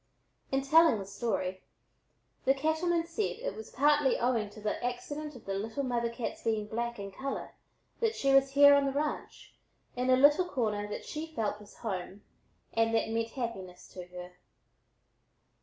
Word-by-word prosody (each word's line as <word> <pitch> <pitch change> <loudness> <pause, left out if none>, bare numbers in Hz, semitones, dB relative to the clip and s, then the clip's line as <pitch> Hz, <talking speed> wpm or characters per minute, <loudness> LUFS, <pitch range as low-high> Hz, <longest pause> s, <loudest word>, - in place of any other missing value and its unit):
In 270 0 +1
telling 320 -2 +6
the 195 - -5
story, 190 -3 -2 0.8
the 270 +1 +4
cattleman 320 +4 +1
said 340 +5 -2
it - - -4
was 220 - -8
partly 290 0 +3
owing 235 -4 +1
to 210 - -13
the 210 +2 -3
accident 290 +5 -4
of 245 - -13
the 195 - -3
little 220 +7 -3
mother 240 -2 0
cat's 235 0 -5
being 220 -2 0
black 235 +2 -3
in 200 -1 -6
color 270 +7 -5 0.5
that 455 -1 +1
she 275 0 +2
was 270 0 +4
here 285 0 +8
on 280 0 +4
the - - 0
ranch 295 +2 -4 0.4
in 250 +1 -1
a 255 - +7
little 290 +7 +5
corner 210 -5 -1
that 210 - -6
she 310 +1 -5
felt 210 -3 -1
was 205 - -15
home 195 0 -4 0.5
and 225 0 +2
that 225 - +1
meant 225 0 -1
happiness 190 -8 -5
to 180 -1 -9
her. 180 0 -10
240 Hz, 175 wpm, -31 LUFS, 210-280 Hz, 0.8 s, here